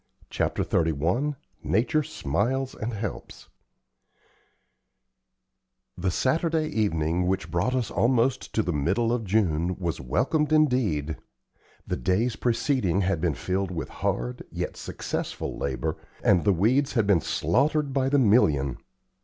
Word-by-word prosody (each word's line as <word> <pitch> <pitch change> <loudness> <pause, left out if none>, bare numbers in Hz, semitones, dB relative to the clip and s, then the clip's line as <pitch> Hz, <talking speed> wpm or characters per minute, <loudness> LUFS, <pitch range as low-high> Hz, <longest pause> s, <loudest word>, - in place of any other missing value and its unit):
CHAPTER - - 0
XXXI 85 - 0 0.3
NATURE 120 +9 +1
SMILES 130 - -1
AND 115 +2 -4
HELPS 105 -2 -6 2.5
The 90 +1 -1
Saturday 155 - +1
evening 90 - 0
which 90 -3 -1
brought 100 +10 0
us 125 -4 -1
almost 125 +2 +1
to 110 - +2
the 90 - -1
middle 95 +11 +1
of 120 -3 -2
June 90 -4 +1
was 85 -3 -3
welcomed 135 - 0
indeed. 120 - +2 0.7
The - - -2
days 105 - +1
preceding 115 - +1
had 95 -3 0
been 85 - +1
filled 95 0 -2
with 85 -4 -4
hard, - - -2
yet - - -4
successful - - -4
labor, 75 +4 -2 0.3
and 90 -4 +4
the 100 - +5
weeds 125 - +2
had 115 -4 +2
been 100 -5 +3
slaughtered 145 - +1
by 135 -1 +1
the 145 - +3
million. 80 - +3
105 Hz, 130 wpm, -26 LUFS, 85-130 Hz, 2.5 s, the